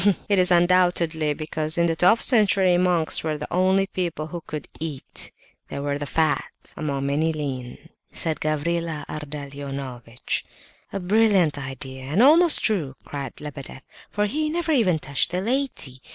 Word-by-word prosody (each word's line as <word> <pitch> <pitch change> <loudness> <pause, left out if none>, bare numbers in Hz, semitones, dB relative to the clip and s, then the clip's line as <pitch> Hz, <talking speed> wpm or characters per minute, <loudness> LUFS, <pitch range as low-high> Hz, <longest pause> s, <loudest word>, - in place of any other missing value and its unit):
"It 200 -2 +3
is 180 - +4
undoubtedly 175 -3 +3
because, 155 +1 -2
in 170 - +3
the 165 -1 +1
twelfth 180 +7 +4
century, 200 -6 +4
monks 175 -3 +2
were 155 -1 -1
the 150 - -6
only 190 +2 +3
people 170 -5 -3
one 170 +1 -6
could 150 -1 -6
eat; 155 -4 -6 0.4
they - - -6
were 140 0 -2
the 145 - -4
fat, 160 +1 +1 0.3
among 140 -3 -2
many 150 +4 +1
lean," 135 -5 -5 0.3
said 160 -2 -1
Gavrila 155 0 -1
Ardalionovitch. 140 -5 -5 0.5
"A 195 - -3
brilliant 190 -6 +3
idea, 130 0 -7
and 150 +8 -1
most 320 +5 +6
true!" 165 - 0
cried 140 -3 -6
Lebedeff, 140 -3 -8 0.3
"for 210 0 0
he 305 +8 -1
never 335 0 -1
even 215 - +3
touched 140 -3 0
the 180 - -1
laity. 235 - -2
160 Hz, 150 wpm, -24 LUFS, 145-185 Hz, 0.5 s, most